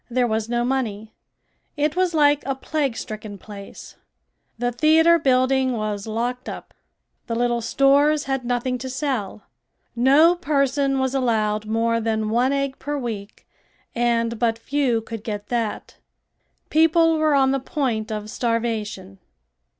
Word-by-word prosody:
There 250 +1 +1
was 220 -1 -1
no 240 0 0
money. 220 -5 -2 0.6
It 295 +2 0
was 365 -2 +1
like 290 -1 +4
a 270 - 0
plague 275 -3 -2
stricken 215 -1 -7
place. 200 0 -11 0.6
The 245 +1 -1
theater 320 +6 +4
building 260 -1 +2
was 215 -2 -3
locked 240 +3 -3
up. - - -9 0.5
The 230 - -2
little 240 0 0
stores 285 +5 +3
had 270 -2 -2
nothing 245 +1 -1
to 260 +2 -5
sell. 255 -7 -3 0.5
No 280 +8 +5
person 275 -4 0
was 265 0 0
allowed 215 -5 0
more 230 +1 +1
than 220 -1 -1
one 245 +4 +2
egg 275 -1 -2
per 290 +1 -3
week 220 -6 -6 0.5
and 235 -1 0
but 230 -1 +1
few 255 -2 0
could 225 -1 -8
get 210 -2 -5
that. 230 -3 -3 0.7
People 325 +1 +4
were 310 -2 +3
on 265 -1 +4
the 275 - 0
point 250 -7 -2
of 210 -1 -4
starvation. 215 -5 -3
245 Hz, 140 wpm, -22 LUFS, 225-275 Hz, 0.7 s, No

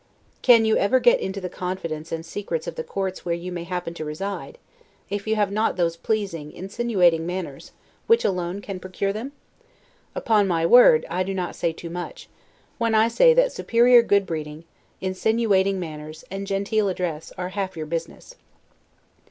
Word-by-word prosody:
Can 230 -3 +6
you 220 - +3
ever 250 +6 +3
get 240 -1 +5
into 190 +1 -4
the 185 - -4
confidence 170 -4 -5
and 165 0 -3
the - - -14
secrets 205 - -4
of - - -4
the 480 - -5
courts 190 - -4
where 170 -1 -1
you 175 +2 -6
may 175 -1 -5
happen 180 -2 -4
to 165 - -6
reside, 195 - -5 0.5
if 205 +1 -3
you 220 - +2
have 205 -2 +1
not 215 +2 +1
those 170 -2 0
pleasing, 170 -6 -3
insinuating 190 -4 +1
manners, 175 -6 -6 0.4
which 460 0 +4
alone 180 0 -1
can 195 -2 -6
procure 190 +2 -3
them? 230 +6 -5 0.8
Upon 210 -3 +2
my 165 -3 +1
word, 170 -6 +7
I 180 +2 -2
do 190 +1 -2
not 180 -2 -3
say 170 - 0
too 165 +1 -9
much, 180 - -7 0.5
when 230 -1 +1
I 220 +1 +4
say 485 - +5
that - - +4
superior 240 +1 +5
good 200 -3 +2
breeding, 155 -2 -5 0.4
insinuating 195 0 +1
manners, 155 -2 -8
and 195 0 -5
genteel 200 +1 0
address, 175 -4 -4
are 180 0 -3
half 190 -2 -4
your 155 - -4
business. 165 - -6
190 Hz, 175 wpm, -24 LUFS, 170-220 Hz, 0.8 s, word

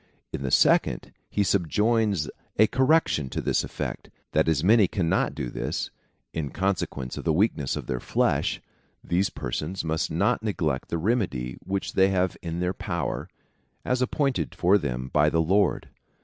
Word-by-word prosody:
In - - -3
the 70 - -2
second, - - +3 0.2
he 105 - +1
subjoins 100 0 +1 0.3
a 110 - +7
correction 130 - +2
to - - -3
this - - +1
effect, - - -5 0.2
that 80 +1 +2
as 80 -2 +2
many 105 +1 +5
cannot 85 -2 0
do - - -4
this, - - -3 0.4
in 75 -4 -3
con 95 +4 0
sequence 65 -7 -5
of - - -6
the 80 - +2
weakness 80 - +1
of - - -5
their 65 - -2
flesh, - - 0 0.4
these 90 +3 +1
persons 75 +9 -4
must 80 -1 -1
not 100 +10 +1
neglect 80 -11 -2
the 85 - -1
remedy 80 - -1
which 95 0 -3
they 95 0 +4
have 95 -2 +1
in 85 +1 -4
their 90 +1 0
power, - - -3 0.6
as 125 0 0
apjjointed 135 +1 0
for 95 +4 +4
them 65 -4 -4
by 75 0 +4
the 80 - 0
Lord. 95 +4 +2
90 Hz, 165 wpm, -26 LUFS, 75-105 Hz, 0.6 s, a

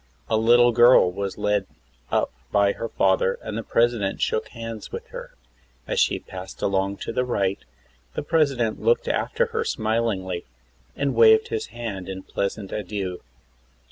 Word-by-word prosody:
A - - +4
httle 120 +2 +5
girl 120 -6 +6
was 100 +1 -4
led 105 -2 0 0.4
up - - +1 0.2
by 100 -1 +4
her 115 - -5
father 95 -1 +2
and 110 - -5
the 115 - -2
President 115 -4 +1
shook 110 - 0
hands 115 -2 -8
with - - -6
her. - - -9 0.5
As - - 0
she - - +3
passed 95 0 -9
along 100 0 0
to - - -4
the 125 - +1
right 100 -6 0 0.6
the - - -2
President 140 -8 +1
looked 475 0 +2
after 485 +2 0
her 455 - 0
smiHngly 110 - -1 0.5
and 140 -1 0
waved 110 -2 +6
his 110 - -3
hand 110 -6 -6
in 95 - -4
a - - -8
pleasant 100 0 -3
adieu. 95 -3 -4
110 Hz, 160 wpm, -24 LUFS, 95-120 Hz, 0.6 s, girl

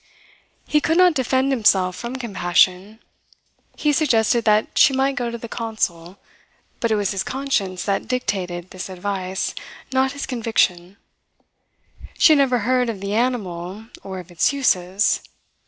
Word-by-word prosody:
He 300 - +2
could 325 +2 +1
not 365 -1 +6
defend 260 0 +1
himself 190 -7 +3
from 235 +6 -6
compassion. 190 -2 +1 0.7
He 300 -1 +1
suggested 235 -6 +2
that 215 0 +2
she 275 - +5
might 270 +1 +1
go 245 -3 -2
to 235 - -5
the 235 - -8
consul, 195 -6 -3 0.6
but 230 - 0
it 220 - +2
was 205 -2 0
his 195 -2 -2
conscience 215 -10 -2
that 200 +1 -1
dictated 190 -7 -3
this 185 +1 -7
advice, 190 0 -3 0.4
not 265 +1 +2
his 280 - -5
conviction. 200 -6 -1 1.2
She 315 - +6
had 295 - +3
never 260 -3 +3
heard 250 -1 +2
of 215 -4 -4
the 200 +1 -4
animal 210 -4 -2
or 190 -1 -7
of 180 -1 -10
its 175 - +2
uses. 200 -8 +1
220 Hz, 150 wpm, -21 LUFS, 185-255 Hz, 1.2 s, not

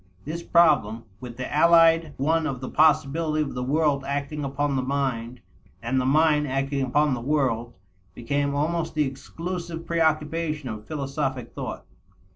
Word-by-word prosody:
This 160 +4 -4
problem, 145 -11 +3 0.2
with 120 -2 -9
the 130 - -5
allied 165 -1 +5
one 160 +3 +1
of 135 -4 -4
the 130 - -6
possibility 155 0 +2
of 145 - -6
the 125 - -4
world 145 +1 +1
acting 145 +2 -3
upon 140 +1 -1
the 130 - +1
mind 125 -3 -2 0.4
and 130 -1 0
the 130 - -1
mind 150 +1 +3
acting 135 +1 -1
upon 145 +2 +2
the 120 - -3
world, 120 -4 -1 0.4
became 140 +3 -1
almost 160 +3 -1
the 150 -1 +2
exclusive 165 +5 -6
preoccupation 155 -3 0
of 110 -1 -7
philosophic 135 -4 -3
thought. - - -6
145 Hz, 150 wpm, -25 LUFS, 130-155 Hz, 0.4 s, allied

